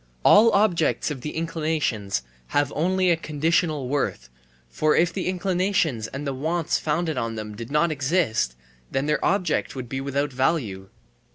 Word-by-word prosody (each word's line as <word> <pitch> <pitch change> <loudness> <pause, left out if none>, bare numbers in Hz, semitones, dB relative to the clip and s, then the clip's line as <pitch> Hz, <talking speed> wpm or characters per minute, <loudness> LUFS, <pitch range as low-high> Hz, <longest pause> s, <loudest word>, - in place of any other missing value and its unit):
All 225 +2 +7
objects 175 -7 +2
of 135 -4 -5
the 150 - -5
inclinations 155 - -1 0.2
have 145 0 0
only 185 +3 +2
a - - +4
conditional 155 -2 0
worth, 125 - -2 0.4
for 150 - +1
if 170 0 +3
the 185 - -3
inclinations 180 - 0
and 135 +5 -6
the 140 - -2
wants 160 +4 -1
founded 155 -2 -1
on 115 -1 -3
them 105 -1 -6
did 115 +2 -7
not 150 +3 +2
exist, 140 - 0 0.3
then 135 +1 -1
their 150 0 0
object 185 -5 0
would 130 -2 -5
be 135 +2 -4
without 140 +1 -2
value. 125 - -1
150 Hz, 160 wpm, -24 LUFS, 130-170 Hz, 0.4 s, All